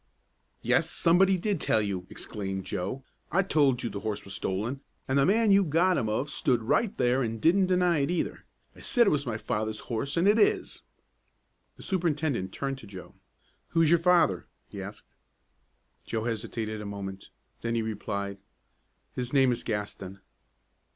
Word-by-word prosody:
"Yes, - - +2
somebody 185 +3 +4
did 195 -2 -1
tell 110 - +2
you!" 95 -3 -3
exclaimed 95 -2 -5
Joe. 100 +9 -4 0.3
"I 195 +4 +3
told 145 -8 +2
you 120 - -1
the 100 - -5
horse 110 -1 -4
was 100 - -5
stolen, 110 +9 -3 0.3
and 135 +1 +2
the 135 - +4
man 220 +2 +4
you 195 0 +6
got 175 +3 +2
him 110 -8 0
of 120 +7 -1
stood 125 -5 +1
right 200 - +1
there 125 +1 +2
an' 115 -1 -2
didn't 185 - +3
deny 180 -3 +3
it, 140 - 0
either! 175 - -2 0.3
I - - -15
said 240 -1 +3
it - - +3
was 145 -2 0
my 110 -3 -2
father's 110 0 -3
horse, 135 +7 -3
an' 170 - +3
it 210 +3 +5
is!" 210 - +1 1.0
The - - -12
superintendent 155 - -1
turned 135 +3 -3
to 110 - -12
Joe. 95 -2 -10 0.5
"Who 165 - +2
is 155 - +3
your 170 - +5
father?" 165 - +3 0.2
he - - -7
asked. - - -10 0.9
Joe 110 -1 -3
hesitated 110 -1 -3
a - - -7
moment. 95 -1 -6 0.3
Then 115 0 -1
he 115 - 0
replied, 100 -2 -4 0.7
"His 125 +1 -4
name 135 -2 +5
is 120 0 -3
Gaston." 100 -3 -5
125 Hz, 175 wpm, -28 LUFS, 105-170 Hz, 1.0 s, you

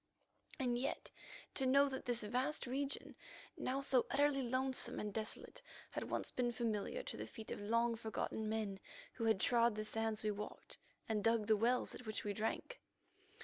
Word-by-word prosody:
And 245 -3 +1
yet 270 - -2 0.4
to 265 - +1
know 280 +2 +6
that 265 -1 -4
this 240 -2 0
vast 255 +8 0
region, 275 +3 -2 0.4
now 270 +2 -1
so 265 -3 +3
utterly 285 0 +3
lonesome 260 +1 +1
and 210 -1 -3
desolate, 220 -1 -3 0.3
had - - -3
once - - -1
been 245 -1 +1
familiar 230 - -1
to - - -5
the - - -4
feet 220 -3 -8
of - - -4
long 230 +3 +2
forgotten 220 -1 -2
men 215 -3 -1 0.3
who 230 - -2
had 220 -4 +4
trod 235 +1 +4
the 215 0 -2
sands 225 0 0
we 215 - +2
walked, 210 +1 -7 0.3
and 215 -2 0
dug 225 -1 +3
the 220 0 +5
wells 240 +4 +2
at 245 - -9
which 215 - -2
we 205 - -1
drank. 225 - -2
230 Hz, 180 wpm, -39 LUFS, 215-260 Hz, 0.4 s, know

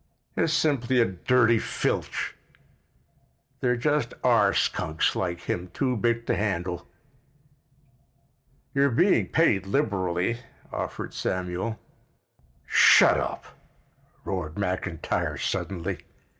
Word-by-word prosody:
"It's 160 - +1
simply 135 -6 +2
a 115 - +5
dirty 115 +4 +2
filch. - - -2 1.2
There 125 -1 +1
just 145 +4 0
are - - +4
skunks 80 0 0
like 85 -2 -2
him 90 +1 -3
too 130 -3 0
big 115 +1 0
to - - +1
handle." 90 -4 -2 1.9
"You're 140 0 +3
being 175 - +3
paid 100 - +2
liberally," 100 - 0 0.3
offered - - -5
Samuel. 95 +5 -3 0.9
"Shut - - +6
up!" - - -4 0.8
roared 85 -5 -3
McIntyre 90 -4 -2
suddenly. 85 -4 -3
105 Hz, 95 wpm, -26 LUFS, 90-125 Hz, 1.9 s, Shut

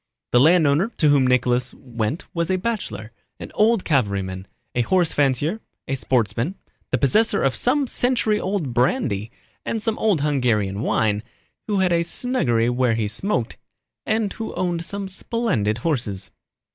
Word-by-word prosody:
The 120 - +5
landowner 160 - +4
to 150 - +4
whom 140 -3 +4
Nicholas 125 0 +1
went 120 +3 -4
was 170 -1 -1
a 185 - +2
bachelor, 185 - -4 0.3
an - - -8
old 220 -1 +2
cavalryman, 100 - -1 0.3
a 120 - +1
horse 175 +6 +2
fancier, 145 - +1 0.3
a - - -2
sportsman, 125 - 0 0.3
the 130 - +1
possessor 205 - +2
of 135 -1 +1
some 275 +3 +2
century 245 -4 +1
old 185 -9 -2
brandy 120 - 0 0.3
and 225 - -2
some 220 0 -2
old 205 -9 +2
Hungarian 115 -9 0
wine, 105 -3 +1 0.5
who 205 -3 +1
had 180 -2 +2
a 170 - +3
snuggery 170 - 0
where 125 -1 +1
he 110 -2 -1
smoked, 120 - -1 0.5
and 220 -2 -1
who 225 - -6
owned 175 -2 -1
some 200 +2 -5
splendid 190 - 0
horses. 115 - -2
145 Hz, 150 wpm, -22 LUFS, -, 0.5 s, The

